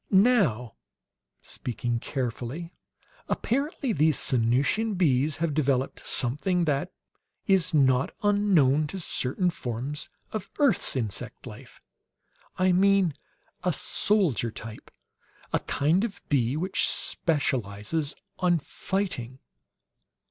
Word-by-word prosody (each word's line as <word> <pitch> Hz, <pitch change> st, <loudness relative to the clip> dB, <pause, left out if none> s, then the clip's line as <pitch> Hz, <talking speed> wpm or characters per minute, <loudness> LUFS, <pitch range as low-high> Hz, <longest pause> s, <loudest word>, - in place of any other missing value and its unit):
"Now," 190 Hz, -, +3 dB, 0.7 s
speaking 120 Hz, -1 st, -3 dB
carefully, 130 Hz, +7 st, -4 dB, 0.6 s
"apparently 275 Hz, 0 st, -1 dB
these 155 Hz, -1 st, +3 dB
Sanusian 135 Hz, -, +1 dB
bees 150 Hz, -4 st, +2 dB
have 165 Hz, -2 st, -1 dB
developed 135 Hz, -3 st, 0 dB
something 170 Hz, +8 st, +1 dB
that 150 Hz, +4 st, -1 dB, 0.5 s
is 190 Hz, -3 st, +3 dB
not 135 Hz, -3 st, +3 dB
unknown 180 Hz, -9 st, +3 dB
to 190 Hz, +6 st, -6 dB
certain 175 Hz, +2 st, -1 dB
forms 130 Hz, +2 st, -4 dB, 0.2 s
of 215 Hz, -3 st, -5 dB
earth's 275 Hz, -, +2 dB
insect 110 Hz, -7 st, -3 dB
life. -, -, -12 dB, 0.7 s
I 185 Hz, 0 st, +3 dB
mean, 190 Hz, -2 st, +3 dB, 0.5 s
a 180 Hz, -, +2 dB
soldier 165 Hz, -, +2 dB
type. 110 Hz, 0 st, -9 dB, 0.6 s
A -, -, +3 dB
kind 160 Hz, +8 st, +1 dB
of 205 Hz, -4 st, -4 dB
bee 130 Hz, -1 st, +1 dB
which 185 Hz, +4 st, +1 dB
specializes 140 Hz, -, -1 dB, 0.2 s
on 175 Hz, -1 st, +3 dB
fighting!" 150 Hz, -, -3 dB
155 Hz, 100 wpm, -27 LUFS, 130-190 Hz, 0.7 s, Now